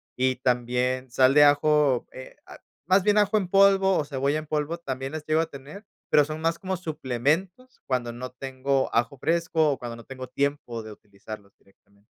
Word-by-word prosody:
y 130 0 +1
también 125 +1 -1
sal 130 +1 +4
de 150 0 +7
ajo, 145 -2 +3
eh, 130 - -11
ah, - - -13 0.3
más 185 +2 +3
bien, 210 +1 +3
ajo 210 +1 +3
en 185 -3 -2
polvo, 195 -1 +4
o 150 - -1
cebolla 140 +1 -1
en 155 - -10
polvo, 150 +2 -2
también 135 -4 -5
las 155 -1 -6
llego 155 +1 +2
a 165 - 0
tener, 150 +9 -11 0.3
pero, 150 - +6
son 155 +2 -6
más 165 +1 0
como 190 0 -3
suplementos, 160 - -2
cuando 125 -3 -1
no 125 +2 -7
tengo 135 +1 -2
ajo 120 +4 0
fresco, 165 -2 +1
o 135 - -2
cuando 120 -1 -7
no 115 - -13
tengo 130 -1 -8
tiempo 140 -3 -2
de 110 - -9
utilizarlos 100 0 -12
directamente. 100 +1 -30
140 Hz, 190 wpm, -25 LUFS, 125-165 Hz, 0.3 s, de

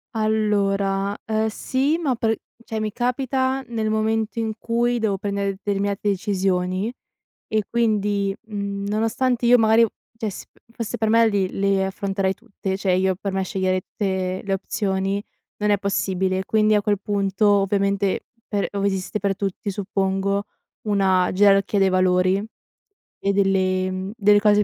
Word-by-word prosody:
Allora, 200 -2 +1
ehm, 220 0 0
sì 265 +7 0
ma 285 -7 0
per 225 -1 +1 0.3
cioè 220 -2 -4
mi 215 -1 -2
capita 260 +3 0
nel 220 -2 -2
momento 220 +1 0
in 220 -1 -1
cui 240 +1 0
devo 205 -3 0
prendere 200 0 -1
determinate 200 0 -1
decisioni 190 +1 0 0.6
e 215 -1 0
quindi, 205 -4 +1
mhmm, 200 -1 -4
nonostante 240 +3 0
io 245 +1 +7
magari 225 +1 +5 0.3
cioè 220 -2 -2
s 190 - -8 0.3
fosse 230 -2 -4
per 220 0 0
me 230 0 +5
li 195 -3 0
le 195 -1 +1
affronterei 195 0 -1
tutte, 195 -1 -5
cioè 195 -2 +1
io 190 0 +2
per 195 +1 -4
me 190 0 0
sceglierei 185 -1 0
tutte 190 -2 -2
le 195 - 0
opzioni. 195 0 -1 0.4
Non 210 0 +2
è 205 - +4
possibile, 190 -1 0
quindi 215 -1 +3
a 210 - +3
quel 205 -1 +1
punto, 200 0 +1
ovviamente, 200 -1 +1 0.2
per 205 -2 -1
ove 200 0 0
esiste 190 +1 -2
per 200 -1 0
tutti, 200 +1 -3
suppongo 195 0 -1 0.4
una 190 -3 +3
gerarchia 200 +1 +4
dei 195 - +4
valori 185 +1 +2 0.8
e 200 - 0
delle, 185 -1 +2
mhmm, 185 +1 -4
delle 205 -1 +5
cose 210 0 +4
200 Hz, 150 wpm, -23 LUFS, 195-220 Hz, 0.8 s, io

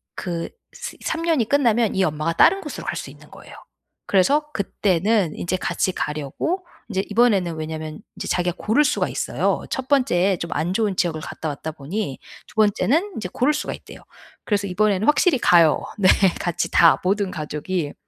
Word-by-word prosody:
그 170 -2 -4 0.2
스 - - -7
3 325 0 -2
년이 305 -10 +1
끝나면 235 -7 +2
이 190 - +2
엄마가 155 +1 -1
다른 390 - +4
곳으로 300 - -7
갈 - - -2
수 - - -6
있는 - - -16
거예요. - - -14 0.5
그래서 285 +11 +2
그때는 195 -2 0
인제 185 +2 -2
같이 185 - -1
가려고 155 - -3 0.2
인제 190 -1 -1
이번에는 205 -7 +2
왜냐면 155 0 -6
인제 - - -6
자기가 180 0 0
고를 245 +8 +2
수가 295 - 0
있어요. - - -1
1 265 0 -3
번째에 195 -9 +2
좀 170 - -5
안 175 +3 -1
좋은 210 -3 0
지역을 165 -4 0
갔다 160 - -5
왔다 155 +2 -5
보니 150 +1 -5 0.3
2 - - -18
번째는 260 - +2
인제 180 -5 -4
고를 270 +5 +2
수가 300 - -3
있대요. - - -12 0.4
그래서 205 -2 0
이번에는 200 +3 +1
확실히 295 -2 +4
가요. 170 -6 +5 0.2
네 190 -3 +3 0.3
같이 175 -1 -2
다 165 -2 +5
모든 195 +1 0
가족이. 155 0 -3
190 Hz, 350 characters per minute, -22 LUFS, 165-235 Hz, 0.5 s, 가요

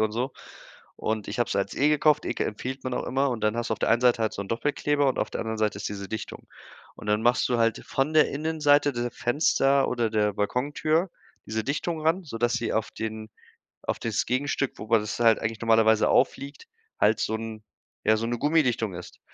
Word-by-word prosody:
und 110 -1 +1
so. 125 +4 -2 0.6
Und 110 -2 -3
ich - - -5
habe 120 - +1
es - - -2
als 100 0 -1
E 145 - +3
gekauft, 150 0 +3
E - - -2
empfiehlt 130 +5 -5
man 130 - -2
auch - - -2
immer, 135 +2 +1
und 115 -3 -4
dann 105 0 +2
hast 120 - -2
du - - +2
auf - - -16
der - - +1
einen 115 - +4
Seite 120 -2 +4
halt 110 - 0
so - - -5
'n 100 - -11
Doppelkleber 145 +3 0
und 130 - -1
auf - - 0
der - - -4
anderen 110 0 -4
Seite 105 -2 0
ist 105 - -3
diese 100 -1 -6
Dichtung. 110 - -7 0.5
Und 105 - -9
dann 105 +1 +2
machst 120 +2 +3
du 120 - +2
halt 115 -1 +1
von 135 +4 -1
der 155 - +5
Innenseite 145 -1 +2
der 120 0 -2
Fenster, 135 +2 +2
oder 120 -2 0
der 105 -1 +1
Balkontür 145 - 0 0.4
diese 110 0 -2
Dichtung 155 +5 -2
ran, 165 +4 +1
sodass 120 -4 -1
sie 115 - -1
auf 110 0 -1
den 110 0 -5 0.5
auf - - -2
das 115 -3 -1
Gegenstück, 140 +1 -1
wo - - -7
man 115 0 +4
das 105 +1 -5
halt 115 -2 +5
eigentlich 110 0 -3
normalerweise 110 -1 +4
aufliegt, 140 - 0 0.3
halt 110 +1 +3
so 110 - 0
'n 110 -1 -7 0.4
ja, 110 +1 +4
so 115 +1 -2
'ne 120 0 -2
Gummidichtung 125 - +1
ist. 90 0 -10
120 Hz, 225 wpm, -26 LUFS, 110-140 Hz, 0.6 s, der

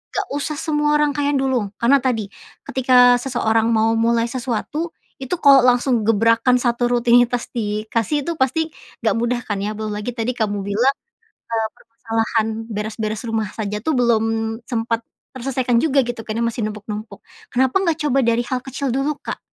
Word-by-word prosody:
enggak 400 -1 -1
usah 300 +1 -3
semua 295 -1 +1
rangkaian 290 -1 +1
dulu. 265 -5 0
Karena 265 +5 +3
tadi, 225 -6 -2 0.3
ketika 250 -1 +4
seseorang 225 -3 +1
mau 220 +1 +3
mulai 230 0 +2
sesuatu, 265 +6 -3 0.2
itu 265 +6 -2
kalau 275 -3 +7
langsung 245 -2 +2
gebrakan 230 +3 +3
satu 240 0 +1
rutinitas 245 0 +3
dikasih 225 +5 -1
itu 335 0 -4
pasti 315 +5 +1 0.3
enggak 220 - +2
mudah, 240 +1 0
kan, 205 -2 -2
ya. 210 +2 -3
Belum 215 0 -4
lagi 210 +4 -4
tadi 230 +1 -1
kamu 205 -3 -1
bilang, 225 +8 +1 0.6
eee, 225 -1 0
permasalahan 225 -1 -2 0.3
beres-beres 215 +1 -3
rumah 220 -2 -1
saja, 210 -2 -3
tuh, 320 - +1
belum 235 -3 +3 0.4
sempat 230 -2 -1 0.3
terselesaikan 255 -1 0
juga, 275 0 +3
gitu, 240 -2 -4
karena 225 +1 -2
masih 230 -1 -1
numpuk-numpuk. 210 +1 -7 0.3
Kenapa 260 +3 +2
enggak 335 -4 0
coba 280 -3 +1
dari 235 0 +2
hal 255 -1 0
kecil 265 +1 -3
dulu, 275 +4 0
Kak? - - -5
240 Hz, 160 wpm, -20 LUFS, 225-265 Hz, 0.6 s, kalau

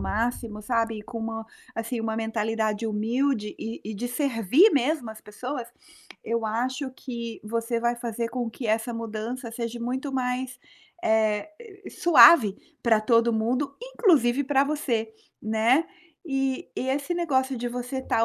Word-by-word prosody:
máximo, 225 -1 -2
sabe." 225 -1 0
E - - -8
com 230 +2 -7
uma 225 0 -4 0.3
assim, 230 +1 -3
uma 225 0 -2
mentalidade 220 0 -1
humilde 220 +1 0
e 225 +1 -5
e 215 0 -5
de 240 +4 -3
servir 265 - +4
mesmo 275 -3 +1
as 220 - -11
pessoas, 245 +4 -6 0.6
eu 230 -1 -1
acho 255 +5 -2
que 235 -3 -6
você 230 +2 -1
vai 240 0 +1
fazer 235 -1 -3
com 240 -2 -3
que 235 +1 -6
essa 220 +2 0
mudança 230 +2 -5
seja 235 0 -4
muito 260 +4 -3
mais, 255 0 -2 0.5
eh, 215 -2 +2 0.4
suave 245 - +7 0.3
para 225 -2 +4
todo 230 +1 +3
mundo, 250 +6 0
inclusive 305 - +3
para 275 0 +3
você, 245 -7 -1 0.3
né. 225 +8 +3 0.4
E 270 -2 -1
e 260 - -2
esse 285 +6 -1
negócio 270 -6 +1
de 245 +1 -3
você 250 +2 -4
tá 230 - +2
235 Hz, 150 wpm, -26 LUFS, 225-260 Hz, 0.6 s, suave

